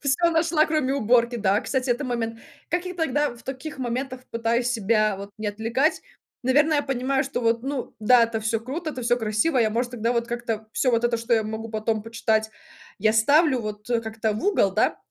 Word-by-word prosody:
Всё 305 +5 +2
нашла, 320 -1 +2
кроме 305 -4 0
уборки. 240 -1 +2
Да, 205 -1 +2
кстати, 260 -2 -1
это 255 +4 0
момент. 230 -2 -3 0.3
Как 350 +2 -1
я 365 - -5
тогда 295 -4 0
в 235 - -16
таких 270 +2 -7
моментах 255 +1 -3
пытаюсь 230 +1 0
себя 215 -2 +1
вот 200 +1 -8
не 215 - -4
отвлекать? 225 +8 0 0.4
Наверное 295 +4 +3
я - - +1
понимаю, 270 0 0
что 270 -2 -3
вот, 230 0 +1
ну 275 -1 -4
да, 235 +2 +6
это 225 -1 -3
всё 225 +1 0
круто, 305 +7 -4
это 255 -4 -6
всё 240 +1 +2
красиво. 225 +5 +1
Я 220 -2 +3
может 240 +2 -1
тогда 235 0 0
вот 235 0 0
как-то 235 -2 -4
всё 255 - +1
вот 230 0 +1
это 240 0 +2
что 230 +1 0
я 220 - +2
могу 220 +1 -5
потом 215 0 -1
почитать 220 -1 0 0.5
я 215 +2 +3
ставлю 280 +4 +4
вот, 210 -1 -7
э, 235 - +2
как-то 220 -1 -2
в 215 - -4
угол, 410 - +3
да, - - +2
240 Hz, 210 wpm, -24 LUFS, 220-270 Hz, 0.5 s, да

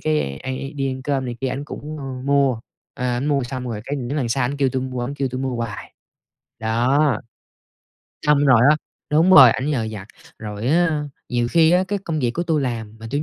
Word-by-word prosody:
cái 150 - -1
anh 130 +9 -4
i 135 +1 -6
đi 135 -2 -2
ăn 130 0 -7
cơm 135 -2 -1
này 120 -1 -5
kia 135 - -1
ảnh 140 +3 -4
cũng 150 +1 -7 0.3
mua. 140 -5 +2 0.3
Ờ, 125 - -4
ảnh 125 +3 -1
mua 140 -3 +1
xong 125 0 -5
rồi 110 -2 -4
cái 145 +2 -3
những 130 +3 -3
lần 125 -5 -1
sau 125 +1 +1
ảnh 140 +3 -2
kêu 135 -2 +2
tui 130 0 -2
mu 130 -1 -5
ổng 125 +4 -3
kêu 135 -2 -1
tui 130 +1 -5
mua 130 -2 -2
hoài. 115 -5 -6 0.6
Đó. 120 +4 +2 1.1
Xong 145 -1 +4
rồi 125 -4 +6
á 155 - +4 0.3
đúng 165 +5 +4
rồi, 130 -9 +10
ảnh 135 +5 -1
nhờ 120 -6 0
vặt. 100 -2 -8 0.3
Rồi 105 +1 -5
á, 160 -2 +2 0.3
nhiều 120 -1 0
khi 165 0 +5
á 180 +1 +4
cái 205 0 -1
công 160 -2 -2
việc 120 -2 +1
của 170 - -2
tui 160 -4 0
làm 110 -4 -4
mà 115 - -8
tui 145 +2 -1
130 Hz, 230 wpm, -21 LUFS, 120-145 Hz, 1.1 s, rồi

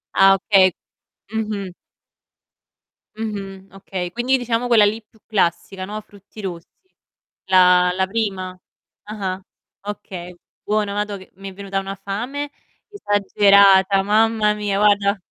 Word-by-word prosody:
Ah, 195 0 +6
okay 190 -1 +4 0.6
Mh-mh. 210 -4 -3 1.5
Mh-mh. 195 -3 -6
Okay, 185 -2 -6
quindi 250 +5 +1
diciamo 245 0 -1
quella 230 -3 +5
lì 215 +2 +1
più 220 0 -28
classica, 185 -1 -1
no, 215 +2 -6
frutti 205 +1 -15
rossi. 175 -3 -6 0.8
La 180 -1 +5
la 190 - +1
prima? 195 -3 -2 0.5
Ah-ah. 195 -3 -5 0.5
Okay, 180 -4 -7 0.3
buono, 210 -1 0
mado, 205 0 -2
che 190 - -15
mi 195 0 -8
è - - -12
venuta 195 0 -4
una 195 0 -6
fame 245 +9 -5 0.4
esagerata, 200 - +4
mamma 215 +1 +2
mia 205 -1 -2
guarda. 205 -1 +3
200 Hz, 120 wpm, -20 LUFS, 190-215 Hz, 1.5 s, Ah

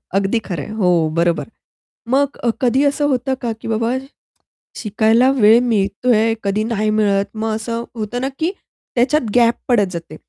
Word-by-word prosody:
अगदी 195 +3 +1
खरं 170 -7 -4
आहे - - -9
हो, 180 -6 +2
बरोबर. 170 -3 +1 0.6
मग 280 +2 +1
अ, 240 - -1
कधी 260 +2 +2
असं 290 +1 +1
होतं 265 0 0
का, 240 -2 -2
की - - -7
बाबा 225 +1 0 0.8
शिकायला 220 +3 +2
वेळ 225 -3 +5
मिळतोय, 225 +1 +1
कधी 200 +2 0
नाही 215 -1 -1
मिळत 205 -2 +2
मग 220 0 -2
असं 230 +1 -4
होतं 225 +2 -4
ना, 265 - -1
की 330 +3 0 0.4
त्याच्यात 250 0 +1
गॅप 235 -1 +5
पडत 205 -7 +2
जाते. 170 -2 -7
225 Hz, 165 wpm, -18 LUFS, 205-245 Hz, 0.8 s, वेळ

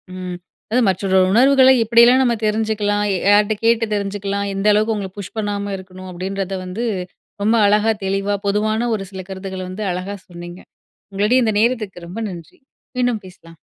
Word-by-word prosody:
ம் 180 -1 -6 0.3
அதாவது 250 +2 +3
மற்றொரு 190 0 +1
உணர்வுகள்ல 260 +4 +6
இப்படியெல்லாம் 235 +3 +5
நம்ம 245 -2 +2
தெரிஞ்சுக்கலாம். 210 -1 0 0.3
யார்ட்ட 205 +1 +4
கேட்டு 230 0 +3
தெரிஞ்சுக்கலாம். 200 0 -2
எந்த 195 +2 -1
அளவுக்கு 215 +1 +1
உங்கள 195 -2 -4
புஷ் 200 +2 -8
பண்ணாம 205 -1 -2
இருக்கணும். 185 0 -11
அப்படின்றத 190 +1 -4
வந்து 200 +7 -4 0.6
ரொம்ப 220 +3 +3
அழகா 210 +2 +3
தெளிவா 195 +1 0
பொதுவான 215 +3 0
ஒரு 200 - -4
சில 190 -1 -7
கருத்துக்கள்ல 190 -1 -6
வந்து 200 +3 -5
அழகா 185 +3 -4
சொன்னீங்க. 175 +1 -9 0.5
உங்களுடைய 210 +6 +2
இந்த 220 - +1
நேரத்துக்கு 215 -7 -1
ரொம்ப 195 +7 -6
நன்றி. 170 -4 -11 0.4
மீண்டும் 245 -4 0
பேசலாம். 165 -2 -15
205 Hz, 155 wpm, -19 LUFS, 190-220 Hz, 0.6 s, உணர்வுகள்ல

